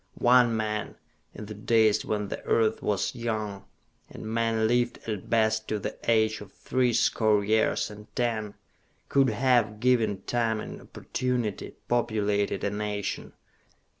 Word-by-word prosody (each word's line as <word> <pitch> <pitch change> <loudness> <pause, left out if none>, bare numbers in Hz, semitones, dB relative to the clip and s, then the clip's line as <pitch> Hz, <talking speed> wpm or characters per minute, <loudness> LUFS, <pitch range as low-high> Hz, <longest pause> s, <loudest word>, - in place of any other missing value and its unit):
One 120 -2 +4
man, 105 -1 -3 0.4
in 105 - -7
the 105 - -7
days 110 +1 +3
when 105 -2 -2
the - - -6
earth 110 -1 +2
was 105 -2 0
young, 110 -5 -4 0.4
and - - -9
man 115 0 +1
lived 120 +1 +1
at 105 -4 -4
best 110 -1 +2
to 110 - -1
the 100 - -5
age 110 -1 +2
of 100 -2 -11
three 125 +3 0
score 110 -2 +2
years 110 0 +1
and 105 0 -12
ten, 110 -4 -1 0.5
could 135 -1 +4
have, 120 -5 +2
given 110 -5 +2
time 115 -2 0
and - - -7
opportunity, 125 -5 -3
populated 105 -4 0
a 100 - 0
nation. 105 -1 -4
110 Hz, 140 wpm, -27 LUFS, 105-120 Hz, 0.5 s, One